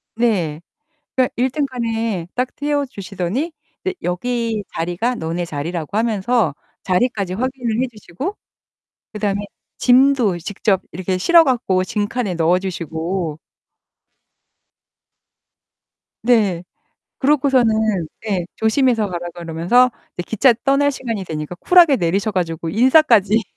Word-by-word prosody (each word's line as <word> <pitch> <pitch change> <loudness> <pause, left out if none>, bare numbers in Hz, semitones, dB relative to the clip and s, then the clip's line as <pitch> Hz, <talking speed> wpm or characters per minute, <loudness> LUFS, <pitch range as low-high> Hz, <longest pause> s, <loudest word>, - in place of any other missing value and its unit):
네. 180 -10 0 0.6
그러니까 255 -1 +2
1 255 +2 +1
등칸에 230 - -2
딱 250 +1 -2
태워 290 0 -1
주시더니 200 - -4 0.3
이제 375 0 -2
여기 225 +4 -1
자리가 175 +9 -1
너네 170 -2 -3
자리라고 165 +4 -4
하면서 220 - +1 0.3
자리까지 195 -1 0
확인을 245 -1 -2
해 - - +1
주시고 215 - -6 0.8
그 210 - -6
다음에 205 -1 0 0.4
짐도 250 -7 +4
직접 195 +2 -1
이렇게 185 +2 -2
실어 335 - +6
갖고 210 -8 +1
짐칸에 205 -1 -2
넣어 170 +2 +3
주시고 170 -2 -4 2.9
네. 205 -8 +3 0.6
그러고서는 230 - +2 0.2
예. 180 -4 0
조심해서 220 -2 +2
가라 175 -1 -4
그러면서 175 +10 +2 0.2
이제 175 - -3
기차 240 +3 +4
떠날 280 +1 +3
시간이 230 -8 -4
되니까 155 0 -5
쿨하게 335 - +5
내리셔 190 +5 0
가지고 165 -3 -2
인사까지 225 - +4
215 Hz, 270 characters per minute, -19 LUFS, 175-250 Hz, 2.9 s, 실어